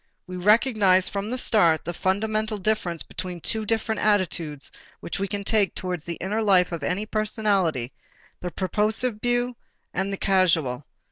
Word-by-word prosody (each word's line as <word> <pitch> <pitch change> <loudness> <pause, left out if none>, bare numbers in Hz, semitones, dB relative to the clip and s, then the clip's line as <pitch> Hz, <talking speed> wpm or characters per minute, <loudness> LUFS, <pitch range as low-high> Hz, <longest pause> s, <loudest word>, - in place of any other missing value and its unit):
We 180 - -8
recognized 205 -1 +4
from 200 +1 -3
the 250 - -1
start 170 -10 +3
the 175 - -3
fundamental 215 +4 -1
difference 190 -5 -1
between 180 -1 -6
two 220 +5 -2
different 220 0 0
attitudes 170 -8 0 0.3
which 170 - -5
we 195 - -1
can 200 0 -4
take 205 -1 +1
towards 180 -4 -4
the 170 - -3
inner 205 +6 -2
life 190 -4 +3
of 170 - -4
any 190 +4 -2
personality, 200 - 0 0.5
the 180 - -4
purposive 210 +6 -1
view 245 0 0 0.4
and 190 +2 -1
the 195 - -3
causal. 160 -10 +1
195 Hz, 155 wpm, -25 LUFS, 180-215 Hz, 0.5 s, recognized